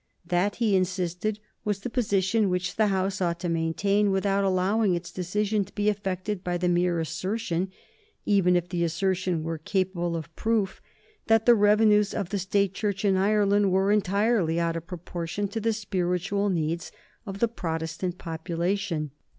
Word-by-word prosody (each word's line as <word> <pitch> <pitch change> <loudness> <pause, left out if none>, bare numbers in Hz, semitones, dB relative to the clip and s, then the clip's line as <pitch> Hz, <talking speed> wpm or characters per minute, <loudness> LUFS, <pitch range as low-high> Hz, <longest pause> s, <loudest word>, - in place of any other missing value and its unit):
That, 180 +3 +1
he 220 -4 +2
insisted, 185 +2 -1 0.3
was 205 -2 -2
the 245 - -4
position 205 -3 +1
which 180 0 -1
the 215 -1 +3
House 190 -1 -1
ought 170 -1 0
to 175 - -2
maintain 195 +5 +1
without 195 +1 +1
allowing 190 +1 +2
its 175 0 -5
decision 205 +3 0
to - - -16
be 205 0 +2
affected 195 -1 -3
by 175 0 -1
the 180 0 0
mere 175 -1 +2
assertion, 180 +3 -2 0.6
even 185 -3 +3
if 175 0 +1
the 175 -1 -1
assertion 180 0 0
were 165 0 -3
capable 180 -1 -1
of 165 0 -7
proof, 220 -4 0 0.5
that 225 -1 +4
the 240 - +8
revenues 210 -1 +4
of 200 -4 -2
the 200 -1 -1
State 195 +1 +1
Church 205 0 -2
in 195 -1 +4
Ireland 205 0 +3
were 190 +2 +3
entirely 200 -4 +2
out 170 -1 0
of 165 0 -6
proportion 175 +2 -4
to 225 - -3
the 225 +1 +1
spiritual 195 -1 -1
needs 170 -1 -2 0.4
of 195 0 -5
the 235 - +2
Protestant 165 -3 -4
population. 170 -1 -2
190 Hz, 165 wpm, -26 LUFS, 175-205 Hz, 0.6 s, the